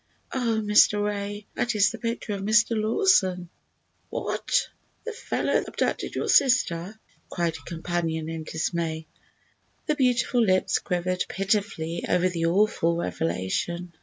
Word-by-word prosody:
"Oh, 235 -4 0
Mr. 210 0 +4
Ray, 205 0 -4
that 240 -2 -1
is 200 -1 +4
the - - -8
picture 230 -2 -3
of 200 - -4
Mr. 215 +3 +3
Lawson!" 215 - +2 0.6
"What! - - -1 0.4
the 460 - -3
fellow 480 - -2
that - - +1
abducted - - -2
your - - -2
sister?" 215 -6 +2 0.3
cried 170 -2 -1
her - - -10
companion 165 -1 -2
in 165 -1 -5
dismay. 160 0 -3 0.8
The 305 - +1
beautiful 250 -3 +2
lips 185 -3 +2
quivered 180 0 -1
pitifully 195 -4 -1
over 180 +1 +3
the 165 -2 -1
awful 170 -2 +2
revelation. 170 - -2
195 Hz, 135 wpm, -26 LUFS, 170-220 Hz, 0.8 s, Mr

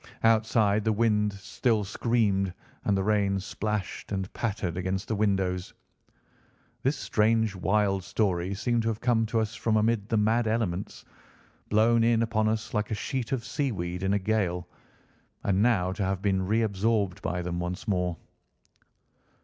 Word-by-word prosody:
Outside 110 -2 +3
the 110 - +2
wind 105 -1 +2
still 105 +3 0
screamed 100 -3 0 0.3
and 100 - +2
the 95 - 0
rain 100 -2 +2
splashed 105 +1 -4
and 95 -1 -3
pattered 100 -6 -2
against 95 +1 -2
the 110 - -1
windows. 95 -3 0 1.1
This 135 +3 +1
strange, 110 -1 +1
wild 95 0 +1
story 95 -1 0
seemed 120 +3 0
to 115 - -2
have 110 -1 -1
come 115 -3 +2
to 115 0 0
us 110 0 -1
from 110 -2 +1
amid 110 -1 +1
the 115 - +2
mad 110 +2 +2
elements—blown 110 +2 -1
in 115 0 +3
upon 110 -1 +1
us 110 +1 -3
like 105 -1 0
a 110 - -1
sheet 120 +3 -3
of 130 -4 -1
sea 140 -3 -1
weed 90 -3 -4
in 95 0 0
a - - +1
gale—and 95 0 -3
now 105 -6 +3
to 100 +2 -3
have 95 0 -1
been 95 -2 +1
reabsorbed 105 -2 +1
by 90 0 -2
them 85 0 -3
once 90 +5 -4
more. 90 -4 0
105 Hz, 155 wpm, -28 LUFS, 95-115 Hz, 1.1 s, Outside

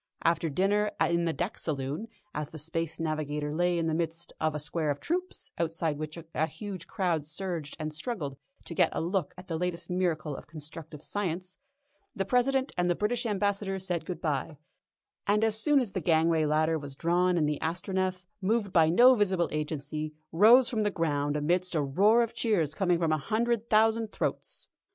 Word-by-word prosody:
After 165 0 +2
dinner 200 +7 +2
in 170 0 +2
the 165 - +1
deck 175 +5 -3
saloon, 145 +6 -3 0.3
as 150 -1 -3
the 160 - -9
Space 165 +1 -3
Navigator 150 -2 -2
lay 175 +2 +2
in 165 - 0
the 160 - 0
midst 165 +1 -2
of 155 -1 +1
a - - -2
square 155 +1 -1
of 145 0 -1
troops, 360 +3 -3
outside 165 -2 -1
which 155 +1 -5
a 160 -1 -2
huge 185 0 -7
crowd 170 -6 -1
surged 170 -2 -4
and 155 0 -3
struggled 155 - -4 0.3
to - - -6
get - - +4
a - - -1
look 180 +3 -1
at 185 +1 -11
the 165 -2 -2
latest 180 0 -3
miracle 165 -5 0
of - - -10
constructive 155 0 -9
science, 185 -2 -3 0.6
the 195 -3 -1
President 260 +4 +2
and 175 0 +2
the 175 - +3
British 230 +5 0
Ambassador 200 -1 0
said 180 -3 -2
goodbye, 155 -4 -2 0.7
and 210 +2 +3
as 220 -1 +3
soon 295 -2 +4
as 240 -7 -2
the 185 - -2
gangway 160 0 +3
ladder 155 +2 +2
was 140 -2 -8
drawn 175 +3 +2
in 155 - +3
the 150 -1 -1
Astronef, 185 +2 -1 0.2
moved 205 0 0
by 160 -2 +5
no 245 +10 +7
visible 190 -7 +2
agency, 150 0 -3 0.2
rose 230 +9 +7
from 225 -3 -1
the 210 - +2
ground 145 -5 0
amidst 175 +4 +1
a 155 - +3
roar 205 +12 +4
of 230 - -4
cheers 175 - +1
coming 180 0 +2
from 165 -2 +1
a 155 - +2
hundred 230 +7 0
thousand 220 0 +3
throats. - - -3
170 Hz, 190 wpm, -29 LUFS, 155-200 Hz, 0.7 s, no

